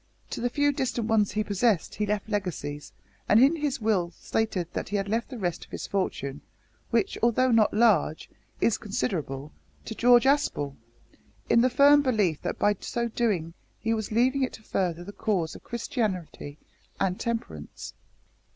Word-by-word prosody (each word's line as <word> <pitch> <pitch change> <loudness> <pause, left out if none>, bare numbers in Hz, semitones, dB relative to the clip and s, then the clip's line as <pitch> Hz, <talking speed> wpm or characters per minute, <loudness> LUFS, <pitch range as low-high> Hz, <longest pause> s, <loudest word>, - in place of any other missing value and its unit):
To - - -4
the 245 - +1
few 290 +3 +2
distant 250 -4 -2
ones 220 -3 +2
he 215 - 0
possessed 205 -2 +1
he 210 - -2
left 210 0 -1
legacies, 180 -8 -4 0.4
and 210 - +6
in 275 +6 +5
his 290 -3 -1
will 210 -6 +1
stated 210 -6 -1
that - - -4
he 205 0 0
left 225 +4 -2
the 255 - -7
rest 175 -5 -2
of - - -16
his - - -5
fortune 145 -8 -3 0.5
which, 395 - 0
although 245 +2 +3
not 225 -2 +4
large, 210 -9 +2 0.3
is 230 - +2
considerable 145 -6 -3 0.3
to - - -5
George 240 +2 +5
Aspel, 265 - +1 0.8
in 235 - +6
the 255 - +4
firm 285 +3 +6
belief 210 - +1
that - - -3
by 205 0 +2
so 235 -2 -2
doing 200 -9 -1 0.2
he 225 0 -1
was 220 -1 -3
leaving 255 +5 +2
it 260 - 0
to 220 - -11
further 175 -5 -2
the 200 - -8
cause 190 -8 -1
of - - -12
Christianity 195 - -3 0.4
and 190 -1 0
Temperance." 225 - -5
215 Hz, 170 wpm, -27 LUFS, 180-240 Hz, 0.8 s, and